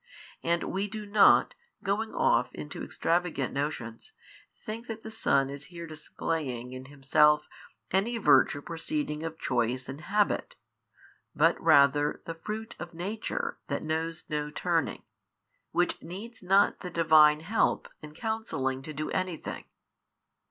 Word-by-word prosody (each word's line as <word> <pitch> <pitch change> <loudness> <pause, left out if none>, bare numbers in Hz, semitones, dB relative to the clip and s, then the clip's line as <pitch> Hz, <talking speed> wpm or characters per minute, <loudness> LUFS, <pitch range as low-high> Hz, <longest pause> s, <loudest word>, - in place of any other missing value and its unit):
And 170 0 +1
we 195 +2 -2
do 215 0 -6
not, 205 0 +5 0.3
going 210 +3 -1
off - - +2
into - - -6
extravagant 170 -6 0
notions, 135 -5 -4 0.4
think 225 +3 -7
that 225 -1 -6
the 220 - -7
Son 140 -10 +2
is 140 0 -7
here 170 -1 -8
displaying 150 -5 -4
in 130 0 -8
Himself 150 +2 +3 0.4
any 210 +6 +1
virtue 145 -8 +4
proceeding 165 - -3
of 160 0 -5
choice 125 -1 -1
and 135 +3 -7
habit, 205 +4 0 0.8
but - - +4
rather 145 -2 +4
the 165 - -4
Fruit 215 +7 -6
of 170 -1 -8
Nature 200 +6 -3
That 140 - -2
knows 160 +1 -2
no 150 -1 -2
turning, 165 0 -1 0.7
Which 175 +1 +1
|618 - - -37
needs 205 +8 -8
not 195 +2 +3
the 180 - -6
Divine 155 -3 +5
[help] 205 +7 +1
in 150 0 -11
counselling 160 - -2
to 155 +3 -7
do 150 +1 -4
anything. 185 -3 -3
165 Hz, 140 wpm, -29 LUFS, 145-195 Hz, 0.8 s, not